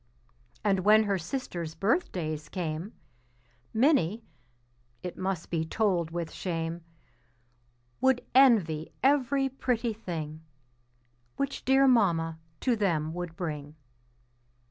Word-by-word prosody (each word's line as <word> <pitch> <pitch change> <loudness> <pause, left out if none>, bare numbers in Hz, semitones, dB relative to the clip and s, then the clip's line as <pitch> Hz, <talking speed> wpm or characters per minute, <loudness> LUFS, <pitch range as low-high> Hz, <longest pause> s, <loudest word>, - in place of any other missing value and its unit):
And 200 -2 +2
when 215 +3 +6
her 200 -2 0
sisters' 170 - -4
birthdays 165 - -1
came 170 +2 -4 0.8
Minnie 230 - +2 0.8
(it 180 - -5
must 185 -3 -3
be 165 -2 +1
told 175 -2 0
with 170 -1 -4
shame) 165 -1 -3 1.2
Would 260 -1 +3
envy 205 - +4
every 275 0 +3
pretty 245 -3 -1
thing 160 -7 -6 0.9
Which 275 0 -3
dear 270 +1 +5
Mamma 170 -10 +3 0.2
to 250 -3 +2
them 165 -7 0
would 175 -1 -5
bring. 150 -4 -5
185 Hz, 100 wpm, -29 LUFS, 165-235 Hz, 1.2 s, when